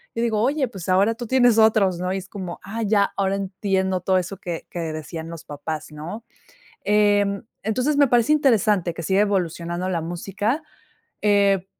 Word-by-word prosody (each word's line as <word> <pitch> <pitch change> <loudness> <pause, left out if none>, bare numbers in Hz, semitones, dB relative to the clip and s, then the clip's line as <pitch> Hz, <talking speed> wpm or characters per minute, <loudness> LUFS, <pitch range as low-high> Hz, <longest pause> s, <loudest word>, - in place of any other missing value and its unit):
Yo 230 - 0
digo: 220 -3 +1
"Oye, 270 +3 +1
pues 190 -7 -8
ahora, 195 +4 +4
tú 240 +1 -7
tienes 245 -2 +4
otros", 205 -5 +4
¿no? 180 +1 -2
Y 190 - -1
es 190 0 -7
como: 185 -4 -7
"Ah, 220 +3 -5
ya. 205 -1 +2
Ahora 195 0 +1
entiendo 190 -1 -1
todo 185 +1 +2
eso, 185 +1 -3
que 175 -5 -6
que 175 - -5
decían 160 +1 -6
los 165 -2 -8
papás", 150 +1 -6
¿no? 165 +10 -7 0.6
Em, 205 0 +2 0.2
entonces 250 +8 0
me 285 -1 +5
parece 240 +3 +3
interesante 215 - +2
que 170 - -6
siga 190 +5 +2
evolucionando 175 -3 -1
la 175 -3 -1
música. 195 - -2 0.6
Eh, 200 -2 +3
195 Hz, 180 wpm, -23 LUFS, 180-220 Hz, 0.6 s, me